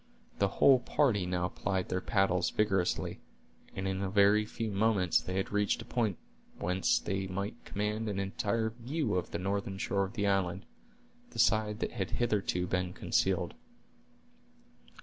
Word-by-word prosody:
The - - +4
whole 135 -2 +7
party 115 -8 +1
now 90 0 0
plied 95 -1 -2
their 90 0 -1
paddles 95 -4 +2
vigorously, 95 -4 0 0.6
and 95 0 -2
in 95 0 -2
a 95 - -1
very 100 +2 +4
few 110 0 -4
moments 100 -3 +2
they 95 - -5
had 95 - -1
reached 105 0 +1
a - - -7
point 110 -7 0 0.4
whence 90 +2 +1
they 95 -1 -2
might 100 +5 -4
command 105 +2 -2
an 100 - -3
entire 105 +3 -1
view 125 +2 -2
of 90 - -1
the - - -3
northern 100 +1 -2
shore 100 0 0
of 95 - -9
the 105 -3 -1
island, 95 -2 0 0.6
the - - -12
side 105 +1 +2
that - - -1
had - - -3
hitherto 100 -6 0
been 90 0 -1
concealed. 95 -1 0
100 Hz, 160 wpm, -31 LUFS, 95-105 Hz, 0.6 s, whole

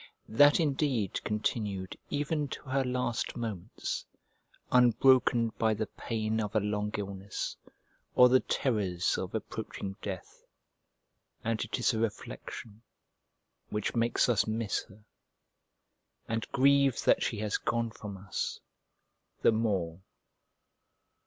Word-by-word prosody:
That 145 +8 +6
indeed 135 - 0
continued 105 -3 -2
even 145 +1 -1
to - - -7
her 135 0 0
last 125 -2 -1
moments, 110 -7 -4 0.7
unbroken 125 -1 +5
by 110 -1 +3
the 110 +1 -1
pain 110 0 -2
of 105 0 -4
a - - +5
long 105 0 -1
illness, 100 -1 -4 0.6
or 125 - +9
the 130 +1 +5
terrors 100 -12 0
of - - -4
approaching 95 0 -5
death; 95 -3 -7 1.0
and 115 -1 0
it 110 - -3
is 125 +1 +2
a 110 - -1
reflection 110 0 -5 0.9
which 105 0 -2
makes 115 0 +2
us 115 -5 +2
miss 110 -1 -1
her, 105 +2 -18 1.2
and 115 0 -3
grieve 140 -1 +4
that - - +4
she 115 - -1
has 105 0 -1
gone 115 -1 -1
from 105 -3 -8
us, 95 +1 -3 0.8
the - - +7
more. 95 -7 -1
110 Hz, 120 wpm, -30 LUFS, 105-125 Hz, 1.2 s, or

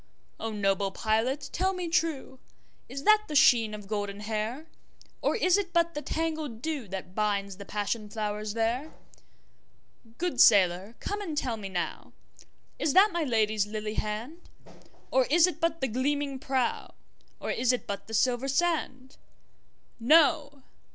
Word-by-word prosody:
O 225 - -3
noble 195 -2 0
pilot 230 +8 -1
tell 375 +2 +1
me 360 -2 -4
trueIs 275 -4 -4
that 425 +2 +5
the 300 - -5
sheen 225 -5 +5
of 210 -1 -10
golden 205 -1 -4
hair? 220 +7 -3 0.6
Or - - +1
is 370 -3 +3
it 365 -3 -4
but 335 -1 +2
the 295 - -4
tangled 310 -8 -3
dewThat 200 - -4
binds 200 -2 -1
the 200 - -9
passion 210 +1 -3
flowers 210 0 -3
there? 235 +7 -1 1.2
Good 345 -7 0
sailor 190 +1 +5
come 410 +1 -4
and 325 -7 -5
tell 250 -5 -1
me 205 -3 -7
nowIs 190 - -6
that 395 +4 +6
my 340 -2 -1
Lady's 215 -5 +1
lily 215 0 -4
hand? 225 +12 -5 0.6
Or 260 -1 +3
is 330 +5 +5
it 350 -3 -4
but 330 -1 0
the 265 - +1
gleaming 275 +3 -1
prow, 260 -2 -2 0.4
Or - - -3
is 250 0 +2
it 250 - -2
but 200 -1 -5
the 225 - -4
silver 250 +3 +1
sand? 275 -3 -1 0.8
No! 285 +1 +3
255 Hz, 145 wpm, -28 LUFS, 215-315 Hz, 1.2 s, that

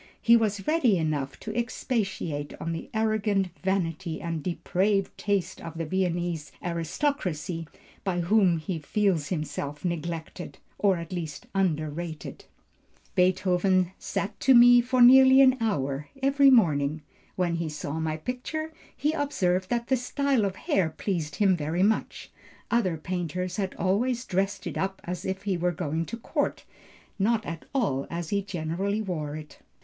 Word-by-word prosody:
He 235 - +6
was 210 -3 +1
ready 290 - +3
enough 150 -4 -2
to 215 -1 -6
expatiate 195 - -2
on 165 - -3
the 165 - -5
arrogant 215 -3 +1
vanity 180 -3 -1
and 165 -2 -3
depraved 190 +4 0
taste 200 -3 -1
of 165 -1 -8
the 165 - -2
Viennese 175 -3 -1
aristocracy, 170 - -2 0.4
by 180 -2 0
whom 185 -1 +3
he 160 +2 -4
feels 175 -1 0
himself 150 -2 -4
neglected, 170 0 -4 0.2
or 195 -3 +3
at 170 +1 -7
least 160 -5 -5
underrated." 160 -4 -2 0.7
"Beethoven 185 0 +2
sat 200 - -3
to 265 -1 +5
me 245 0 +8
for 250 +1 +3
nearly 265 +1 +8
an 260 -1 +7
hour 140 -10 -1 0.2
every 275 0 +5
morning. 155 - +3 0.3
When 175 -2 0
he 165 -1 -2
saw 150 +1 -4
my 160 -1 -1
picture, 285 - -4 0.2
he 295 +3 +1
observed 185 - 0
that 235 -1 0
the 265 - +3
style 265 -1 +1
of 190 -1 -2
hair 185 -3 +1
pleased 160 -3 -3
him 195 -3 +3
very 165 +3 -1
much; 215 +2 -1 0.4
other 190 -8 +2
painters 180 +1 -3
had 190 -2 -2
always 235 +6 0
dressed 195 0 -1
it - - -4
up 190 0 -2
as 180 0 -5
if 190 +1 -3
he 195 -3 0
were 175 +1 +1
going 160 0 -2
to 230 - -5
court, 230 - -2 0.5
not 220 +3 +2
at 165 -1 -6
all 140 - 0
as 170 -1 -4
he 200 -1 +1
generally 195 +3 -2
wore 155 -6 -3
it." 155 -1 -10
185 Hz, 150 wpm, -27 LUFS, 165-215 Hz, 0.7 s, me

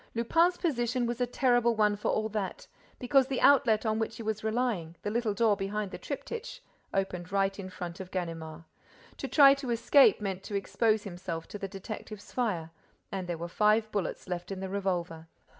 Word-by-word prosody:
Lupin's 335 +10 +3
position 245 -6 0
was 240 +1 -3
a 245 - +2
terrible 245 -2 +2
one 210 -1 +3
for 205 - -2
all 215 0 +1
that, 205 -3 -4 0.3
because 265 +1 +3
the 265 -2 -1
outlet 240 -6 +5
on 220 0 +1
which 225 0 -2
he 230 - -6
was 215 0 -3
relying, 220 -8 -1
the 205 - -2
little 225 -2 0
door 220 -2 +3
behind 200 0 -3
the - - -7
triptych, 475 +2 -6 0.3
opened 180 -2 -2
right 195 0 +1
in 185 -1 -6
front 175 -1 -7
of 190 -1 -7
Ganimard. 165 -3 -5 0.5
To - - -4
try 275 -2 +7
to 275 -2 -5
escape 250 +4 +5
meant 195 -3 -3
to 205 - -5
expose 215 +2 +1
himself 175 -4 -6
to 205 - -7
the 195 - -3
detective's 205 +1 -8
fire; 180 -10 -1 0.4
and 190 -2 -4
there 175 -1 -3
were 170 +1 -5
five 215 +4 +2
bullets 200 -3 -3
left 180 +1 -4
in 195 - -4
the 190 0 -4
revolver. 175 -4 -2
210 Hz, 190 wpm, -30 LUFS, 185-235 Hz, 0.5 s, try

